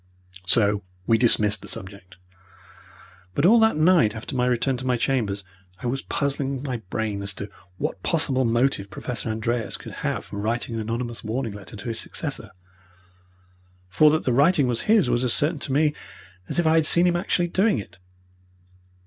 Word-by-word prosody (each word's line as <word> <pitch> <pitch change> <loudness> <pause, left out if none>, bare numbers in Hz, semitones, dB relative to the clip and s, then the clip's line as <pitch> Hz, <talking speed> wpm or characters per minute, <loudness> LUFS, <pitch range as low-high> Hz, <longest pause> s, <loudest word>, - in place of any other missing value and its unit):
So 105 0 +3 0.2
we 115 +1 +3
dismissed 110 -4 +3
the - - -10
subject, 95 -1 -9 1.2
but 140 - +2
all 225 +5 +7
that 220 -7 +3
night 155 -9 +4
after 110 +5 -6
my 125 0 +1
return 125 +2 +1
to 130 - -7
my 125 -1 +2
chambers 115 -6 -1 0.4
I - - -8
was 135 +3 -1
puzzling 140 -1 -2
my 130 -4 -3
brain 105 -1 -2
as 100 -1 -3
to 100 0 -7 0.3
what 95 - -3
possible 140 - +1
motive 120 -3 +1
Professor 115 0 -5
Andreas 110 +1 -1
could - - -10
have - - -2
for - - -8
writing 115 +3 -2
an 115 - -2
anonymous 115 +2 -4
warning 115 0 -3
letter 105 +2 -7
to 100 +3 -8
his 115 -1 -2
successor - - -4 1.4
for 125 +12 +5
that 155 +1 +1
the 125 - +1
writing 145 +3 +4
was 120 -2 0
his 215 - +5
was 120 +1 +1
as 125 - +3
certain 150 +1 +1
to 140 - -3
me 150 +2 +2 0.6
as - - -3
if 175 - +2
I 160 - +4
had 160 -1 +4
seen 170 +1 +4
him 175 -1 +2
actually 175 0 0
doing 195 - +2
it. 90 -5 -8
120 Hz, 185 wpm, -24 LUFS, 110-145 Hz, 1.4 s, all